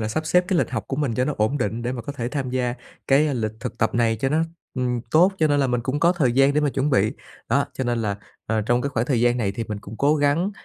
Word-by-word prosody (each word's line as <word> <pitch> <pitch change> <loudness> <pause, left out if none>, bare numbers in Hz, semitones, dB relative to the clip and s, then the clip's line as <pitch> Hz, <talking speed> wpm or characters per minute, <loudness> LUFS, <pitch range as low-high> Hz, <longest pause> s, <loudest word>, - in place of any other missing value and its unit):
là 110 - -2
sắp 155 +8 -2
xếp 180 +3 +3
cái 180 - +2
lịch - - 0
học - - -3
của 135 - -2
mình 140 -6 -1
cho 125 +3 +1
nó 150 - -1
ổn 110 +7 +1
định, 115 +1 -2
để 120 - -2
mà 120 -2 -5
có 145 - -5
thể 120 -4 -4
tham 130 -1 -3
gia 125 -1 -1 0.3
cái 145 +1 +3
lịch 110 -3 -2
thực 125 - -6
tập - - +1
này 115 -1 +2
cho 135 +5 0
nó 155 +3 +2 0.3
ừm, 125 -1 -1
tốt, 175 +7 +5
cho 160 - +4
nên 145 -1 +2
là 135 - +2
mình 125 -1 0
cũng 130 +5 -2
có 170 +1 +5
thời 145 -9 +1
gian 135 +2 +4
để 150 - +3
mà 150 - +2
chuẩn 135 +3 0
bị. 110 -6 +2 0.4
Đó, - - +2
cho 130 - -3
nên 120 -1 0
là, 100 -2 -1 0.3
à, 110 -1 0
trong 120 +1 +2
cái 140 - -1
khoảng 120 -2 -1
thời 130 -5 +1
gian 120 0 +3
này 105 -5 -1
thì 115 +3 -4
mình 105 -1 -5
cũng 105 +2 -10
cố 145 +5 +3
gắng 145 +6 +1
125 Hz, 310 wpm, -23 LUFS, 115-145 Hz, 0.4 s, tốt